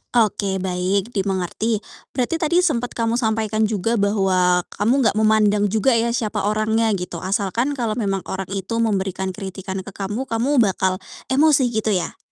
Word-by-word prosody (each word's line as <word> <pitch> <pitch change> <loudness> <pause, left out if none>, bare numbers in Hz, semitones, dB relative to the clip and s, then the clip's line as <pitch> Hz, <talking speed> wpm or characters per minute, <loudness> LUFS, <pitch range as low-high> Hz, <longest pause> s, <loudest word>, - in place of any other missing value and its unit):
Oke, 205 -4 +2
baik, 190 +3 -1
dimengerti. 200 +2 -1 0.3
Berarti, 275 +6 0
tadi 345 +3 +2
sempat 245 -8 0
kamu 230 +1 0
sampaikan 220 -1 +1
juga 220 +2 0
bahwa 185 -3 +2 0.2
kamu 220 +5 +3
enggak 220 - +2
memandang 215 -1 +3
juga, 220 +6 +2
ya, 235 +1 0
siapa 210 -3 -1
orangnya, 215 +1 +1
gitu, 180 -1 -5
asalkan 210 +8 -1
kalau 235 -5 -1
memang 195 -3 -1
orang 190 -1 -5
itu 195 +4 -3
memberikan 190 -4 -1
kritikan 190 -1 -6
ke 195 - -9
kamu, 205 +6 -4
kamu 245 +2 +2
bakal 190 -2 +1 0.3
emosi, 280 -1 +4
gitu, 220 -2 -1
ya? 180 -4 -1
215 Hz, 155 wpm, -21 LUFS, 190-230 Hz, 0.3 s, emosi